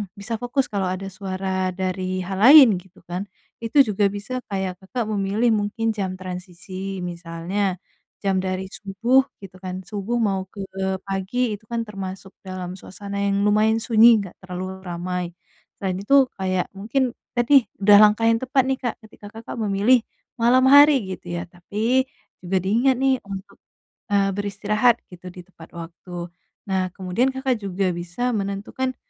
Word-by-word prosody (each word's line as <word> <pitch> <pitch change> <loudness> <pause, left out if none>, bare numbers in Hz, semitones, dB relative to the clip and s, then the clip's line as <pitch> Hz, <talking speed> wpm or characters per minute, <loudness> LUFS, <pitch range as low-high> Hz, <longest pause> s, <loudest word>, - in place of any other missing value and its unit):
bisa 220 +2 -5
fokus, 245 +2 -1
kalau 195 -2 -1
ada 190 +1 -4
suara 190 -1 -3
dari 185 0 -2
hal 190 +1 -4
lain, 250 - +8
gitu 180 -1 -20
kan, 180 +4 -5 0.3
itu 235 +5 +4
juga 205 -3 +1
bisa 205 +6 -4
kayak 190 -2 -3
Kakak 230 +6 -3
memilih 205 +4 +1
mungkin 220 +2 0
jam 195 -3 -3
transisi, 185 +1 -7
misalnya 175 +3 -3 0.5
jam 195 -1 +1
dari 185 0 -2
subuh, 235 +7 +2 0.2
gitu 190 -1 -11
kan. 185 0 -4
Subuh 205 +5 -4
mau 195 -3 0
ke 205 - -12 0.5
pagi 205 +4 -1
itu 205 - -16
kan 230 0 0
termasuk 190 -1 -7
dalam 185 -1 -6
suasana 200 +2 -8
yang 200 0 +1
lumayan 215 +2 +3
sunyi, 225 -1 +6
nggak 190 -3 -9
terlalu 185 +1 -6
ramai. 180 +1 -3 0.5
Selain 190 -2 -1
itu 270 +7 +4
kayak, 185 -1 -1
mungkin 245 +5 -1 0.2
tadi 245 +2 +5 0.2
udah 205 0 +7
langkah 215 +2 +5
yang 230 - +4
tepat, 260 +1 +2
nih, 265 - +1
Kak, 245 -3 -2
ketika 210 - -16
Kakak 230 - -8
memilih 220 +3 +3 0.3
malam 255 +3 +4
hari, 285 -1 +8
gitu 175 - -10
ya. 170 - -3
Tapi 215 +9 0 0.4
juga 190 +2 0
diingat, 235 +8 +2
nih, 270 0 +3
untuk, 195 0 -8 0.6
eee, 195 -1 +3
beristirahat, 210 +4 +2 0.2
gitu, 180 +1 -11
di 180 0 -10
tepat 170 -3 -16
waktu. 170 +1 -8 0.4
Nah, 185 -1 +1
kemudian 215 +8 0
Kakak 265 -3 0
juga 195 -1 -1
bisa 175 +9 -3
menentukan 210 +5 -3
195 Hz, 155 wpm, -23 LUFS, 185-230 Hz, 0.6 s, lain